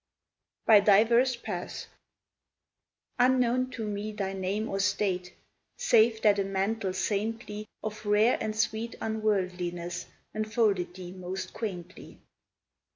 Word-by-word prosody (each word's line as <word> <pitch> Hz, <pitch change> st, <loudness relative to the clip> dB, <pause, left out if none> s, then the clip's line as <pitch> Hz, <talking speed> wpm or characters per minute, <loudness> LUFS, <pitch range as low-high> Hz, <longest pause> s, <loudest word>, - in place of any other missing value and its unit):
"BY 220 Hz, -2 st, +8 dB
DIVERS 230 Hz, +5 st, +4 dB
PATHS" 235 Hz, -, -5 dB, 1.3 s
Unknown 255 Hz, 0 st, +3 dB
to 245 Hz, -4 st, -5 dB
me 210 Hz, +1 st, -3 dB
thy 195 Hz, -2 st, -3 dB
name 195 Hz, +3 st, -2 dB
or 195 Hz, -, -2 dB
state, 195 Hz, -2 st, 0 dB, 0.5 s
Save 225 Hz, -, +3 dB
that 205 Hz, -1 st, +5 dB
a -, -, +2 dB
mantle 195 Hz, +1 st, -1 dB
saintly 210 Hz, +2 st, -2 dB, 0.2 s
Of 215 Hz, 0 st, -5 dB
rare 210 Hz, +4 st, +4 dB
and 215 Hz, -1 st, -2 dB
sweet 220 Hz, +1 st, -1 dB
unworldliness 180 Hz, -5 st, -2 dB, 0.3 s
Enfolded 215 Hz, -5 st, 0 dB
thee 180 Hz, -1 st, -8 dB
most 185 Hz, +1 st, -6 dB
quaintly. 185 Hz, -5 st, -7 dB
210 Hz, 110 wpm, -29 LUFS, 190-220 Hz, 1.3 s, BY